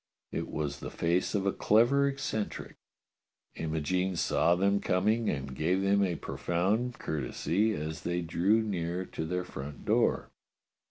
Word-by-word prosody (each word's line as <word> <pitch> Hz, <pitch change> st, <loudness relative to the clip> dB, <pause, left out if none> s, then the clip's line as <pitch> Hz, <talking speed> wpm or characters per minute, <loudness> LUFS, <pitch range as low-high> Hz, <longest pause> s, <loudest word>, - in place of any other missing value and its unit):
It -, -, -3 dB
was 70 Hz, -2 st, -3 dB
the -, -, -6 dB
face 85 Hz, +5 st, 0 dB
of 100 Hz, -1 st, 0 dB
a 100 Hz, -, +3 dB
clever 120 Hz, +6 st, +4 dB
eccentric. 135 Hz, -6 st, -3 dB, 0.8 s
Imogene 80 Hz, +4 st, -1 dB
saw 85 Hz, 0 st, +3 dB
them 100 Hz, +2 st, +2 dB
coming 110 Hz, +5 st, +1 dB
and 70 Hz, -2 st, -3 dB
gave 90 Hz, +7 st, +1 dB
them 100 Hz, +1 st, +3 dB
a 90 Hz, -3 st, 0 dB
profound 105 Hz, +11 st, -1 dB
courtesy 85 Hz, -, 0 dB
as 80 Hz, +1 st, -4 dB
they 85 Hz, 0 st, -1 dB
drew 95 Hz, +7 st, +2 dB
near 90 Hz, -3 st, -2 dB
to 80 Hz, -, -5 dB
their 90 Hz, +2 st, -1 dB
front 70 Hz, -3 st, -8 dB
door. -, -, +2 dB
90 Hz, 145 wpm, -30 LUFS, 80-105 Hz, 0.8 s, clever